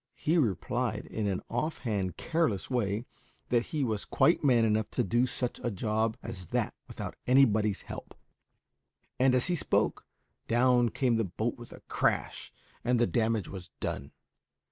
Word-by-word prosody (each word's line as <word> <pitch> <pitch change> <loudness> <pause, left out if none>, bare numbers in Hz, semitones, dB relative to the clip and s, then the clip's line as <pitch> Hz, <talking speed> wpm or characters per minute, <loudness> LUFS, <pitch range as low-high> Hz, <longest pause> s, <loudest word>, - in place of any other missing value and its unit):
He 160 - 0
replied, 110 - 0
in 110 -2 -3
an 95 -2 -1
offhand, 110 - -2
careless 160 - 0
way, 110 -2 0 0.4
that 120 -1 +2
he 150 -3 -1
was 110 -5 -1
quite 165 - +3
man 120 -5 +5
enough 110 -1 +1
to 125 - +1
do 120 +5 +2
such 125 0 -3
a 120 - 0
job 110 +2 0
as 90 -7 -7
that - - -1
without - - -6
anybody's 110 -6 +4
help; - - -8 1.0
and, 130 0 +5
as 125 - +2
he 180 - +1
spoke, - - 0 0.4
down 120 0 +4
came 125 -1 +1
the 115 - +2
boat 110 +5 -2
with 120 -1 -12
a - - -11
crash, - - -1 0.3
and 125 +1 +2
the 120 - +5
damage 110 -4 0
was 95 -2 -8
done. 70 - -4
115 Hz, 160 wpm, -30 LUFS, 105-125 Hz, 1.0 s, man